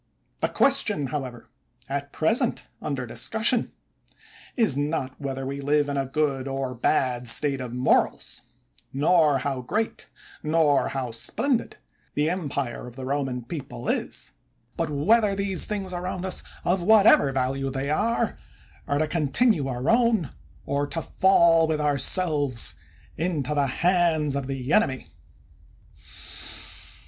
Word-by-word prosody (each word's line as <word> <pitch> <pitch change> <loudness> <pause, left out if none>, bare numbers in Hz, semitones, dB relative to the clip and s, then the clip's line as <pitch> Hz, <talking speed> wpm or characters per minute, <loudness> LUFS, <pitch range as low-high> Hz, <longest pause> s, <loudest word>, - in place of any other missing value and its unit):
The - - 0
question, 235 - +3
however, 130 -3 -5 0.4
at 140 +1 -4
present 230 - +1 0.2
under 135 -4 -3
discussion, 225 - +1 0.8
is 220 - +2
not 145 -2 -3
whether 135 -1 -4
we 140 +1 -4
live 145 +1 +2
in 140 - -3
a 135 -1 -1
good 140 -2 -1
or 135 -1 -3
bad 125 0 0
state 135 +3 +3
of 125 -2 -6
morals; 125 +1 0 0.5
nor 150 0 +3
how 135 -1 -3
great, 210 - -3 0.3
nor 155 -2 +2
how 130 -3 -3
splendid, 235 - -1 0.4
the 150 +2 +1
empire 140 -9 -3
of 120 - -11
the 130 -1 -7
Roman 135 -3 -2
people 130 - -7
is; - - -2 0.4
but 165 -2 -2
whether 200 +8 +2
these 195 -2 +1
things 195 -3 -4
around 180 +1 -4
us, 185 - +1 0.2
of 180 +1 +1
whatever 200 -7 +5
value 135 +1 -1
they 135 +2 -3
are, 230 +9 0 0.5
are 145 - 0
to 155 +1 +1
con 155 -1 -1
tinue 160 - +3
our 125 +2 -4
own, 230 - +2 0.3
or 140 +1 -1
to 165 +3 -4
fall, 170 -4 +4
with 155 -1 -1
ourselves, 145 - +1 0.4
into 155 -4 -1
the 145 -2 +1
hands 165 -1 +1
of 140 -2 -3
the 135 0 -3
enemy. 135 -12 +2
145 Hz, 135 wpm, -25 LUFS, 135-180 Hz, 0.8 s, whatever